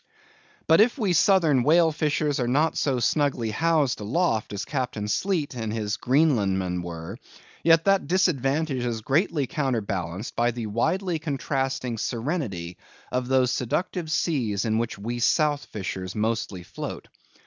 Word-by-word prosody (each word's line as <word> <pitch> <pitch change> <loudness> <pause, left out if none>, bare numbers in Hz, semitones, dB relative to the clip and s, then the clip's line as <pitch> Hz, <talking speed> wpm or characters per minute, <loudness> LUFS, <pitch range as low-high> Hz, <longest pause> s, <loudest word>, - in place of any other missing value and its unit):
But 160 +4 +6
if 235 +5 +3
we 205 -8 +1
Southern 165 -6 +4
whale 160 +5 +4
fishers 150 -1 0
are 120 - 0
not 150 +6 +2
so 135 -4 0
snugly 125 -3 +1
housed 155 +1 +1
aloft 115 - 0
as 100 -1 -4
Captain 125 -7 -3
Sleet 155 - -1
and 110 -3 -4
his 105 -2 -2
Greenlandmen 100 - +1
were; 85 +5 -7 0.4
yet 165 0 +5
that 195 -5 +3
disadvantage 150 -6 +1
is 115 -2 -2
greatly 150 - +1
counter 135 -5 -1
balanced 95 0 -4
by 120 +1 +2
the 120 -1 -4
widely 160 - 0
contrasting 135 -5 -2
serenity 115 - -3 0.3
of 125 0 -1
those 130 -1 +3
seductive 165 - -2
seas 120 - 0
in 110 0 +1
which 115 0 -3
we 120 +4 -4
South 145 +3 +2
fishers 95 -2 -5
mostly 105 -4 -2
float. - - -7
130 Hz, 145 wpm, -25 LUFS, 110-160 Hz, 0.4 s, But